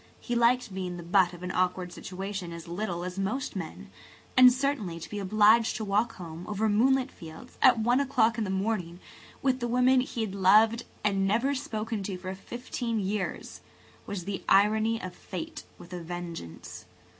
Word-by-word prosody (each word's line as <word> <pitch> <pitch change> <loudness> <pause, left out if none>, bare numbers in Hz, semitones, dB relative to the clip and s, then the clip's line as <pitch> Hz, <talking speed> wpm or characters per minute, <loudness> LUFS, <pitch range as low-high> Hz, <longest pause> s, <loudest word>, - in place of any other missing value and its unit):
He 240 - -4
liked 235 -2 +2
being 180 -2 -4
the 175 - -7
butt 180 +1 +3
of 175 0 -11
an 180 - -3
awkward 180 -1 -1
situation 190 -1 -6
as 170 0 -9
little 175 0 -3
as 180 +1 -5
most 215 +7 -2
men; 170 -5 -7 0.4
and 255 -1 +9
certainly 250 -10 -1
to - - -8
be 210 - -5
obliged 215 +3 +4
to 220 - -3
walk 210 +4 +1
home 170 -1 -8
over 210 +1 0
moonlit 255 +5 +3
fields 165 +9 -12
at 255 - +7
one 240 +4 +2
o'clock 240 -4 +2
in - - +1
the 200 - -3
morning 190 -3 -2 0.4
with 260 -1 +2
the 240 - -2
woman 250 +2 +4
he 245 -2 -4
had 215 -3 -2
loved 215 +5 +4 0.2
and 195 -2 +1
never 235 +8 +2
spoken 225 -5 -3
to 195 -1 -4
for 185 +1 -6
fifteen 235 +2 -4
years 200 0 -3 0.5
was 185 -4 -5
the 200 -1 -4
irony 215 +3 +4
of 185 -3 -6
fate 320 - -7
with 175 - -12
a 175 - -5
vengeance. 170 - -7
205 Hz, 180 wpm, -28 LUFS, 180-235 Hz, 0.5 s, and